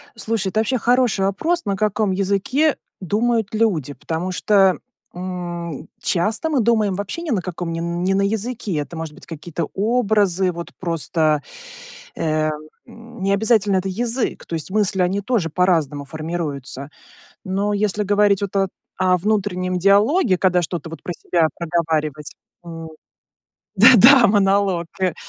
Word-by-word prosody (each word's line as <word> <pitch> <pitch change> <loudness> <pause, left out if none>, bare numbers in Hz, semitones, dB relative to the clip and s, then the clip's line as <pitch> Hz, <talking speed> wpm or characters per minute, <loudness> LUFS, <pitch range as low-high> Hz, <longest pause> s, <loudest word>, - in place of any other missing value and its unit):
Слушай, 220 -3 -2
это 215 - -1
вообще 250 +4 +1
хороший 240 -5 +2
вопрос. 325 - -1
На 200 - 0
каком 210 0 0
языке 200 +11 +1 0.2
думают 220 +3 0
люди? 180 - 0
Потому 165 +5 -4
что, 195 -1 +3 0.4
м, 175 -3 -6
часто 220 - 0
мы 290 -5 +1
думаем 220 -3 +2
вообще 205 - -4
ни 310 - -3
на 200 - +1
каком 175 -1 -5
не 165 - -3
н 170 +1 -3
не 190 - +1
на 195 - +2
языке. 220 -1 -2
Это 150 +3 -4
может 160 -2 -6
быть - - -15
какие-то 165 0 -5
образы. 205 -4 +1
Вот 170 0 -7
просто, 160 -3 0 0.7
э, 155 -1 0
м, - - 0 0.4
м, 230 -2 -12
не 195 +1 +1
обязательно 210 -1 +2
это 185 +1 -1
язык. 235 +5 -2
То 170 - -5
есть 160 +3 -4
мысли, 195 -2 +1
они 190 +3 0
тоже 205 -6 -1
по-разному 155 -5 +1
формируются. 145 -3 -5 0.5
Но 200 +2 -1
если 205 0 0
говорить 205 0 +3
вот 200 0 -3
о 195 -1 +2 0.3
о 185 -1 +4
внутреннем 185 -2 -1
диалоге, 205 - +3
когда 180 -1 +2
что-то 170 -1 -4
вот 165 - -9
про 175 - -5
себя 165 -2 +1
проговаривать, 155 -3 -2 0.3
м 165 -1 -8 0.9
Да-да, 245 +2 +8
монолог, 195 -3 +2 0.2
э, 185 -3 +1
190 Hz, 150 wpm, -20 LUFS, 170-215 Hz, 0.9 s, Да-да